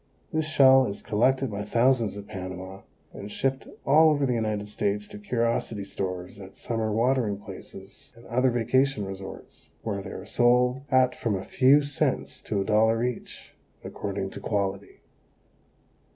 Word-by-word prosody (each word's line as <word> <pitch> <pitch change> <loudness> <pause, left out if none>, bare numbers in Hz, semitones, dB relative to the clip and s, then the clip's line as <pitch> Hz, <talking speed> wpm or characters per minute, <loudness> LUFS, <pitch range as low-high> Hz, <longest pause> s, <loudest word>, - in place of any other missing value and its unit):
This 160 -1 0
shell 135 -4 +6
is 100 - -6
collected 130 +4 +1
by 100 0 -4
thousands 115 0 +2
at 100 - -8
Panama 95 0 -7 0.3
and 100 +1 -8
shipped 135 +3 -1 0.2
all 155 +3 +6
over 145 -2 +2
the 125 - +1
United 110 -3 -2
States 105 0 -2
to 105 - -10
curiosity 115 -1 -1
stores 95 -1 -5
at 95 -1 -11
summer 115 -2 -2
watering 115 -2 +1
places 95 0 -11
and 115 - -16
other 125 +2 +2
vacation 125 -1 +1
resorts, 95 0 -9
where 100 -3 -3
they 95 - -8
are 95 - -8
sold 125 +4 +3
at 130 -1 +4
from 110 -4 -2
a 95 - -5
few 140 +3 +4
cents 145 -1 -2
to 105 - -2
a - - -2
dollar 110 +2 +3
each, 125 -1 -5 0.3
according 100 -1 -4
to - - -7
quality. 100 -2 -3
110 Hz, 155 wpm, -26 LUFS, 100-130 Hz, 0.3 s, shell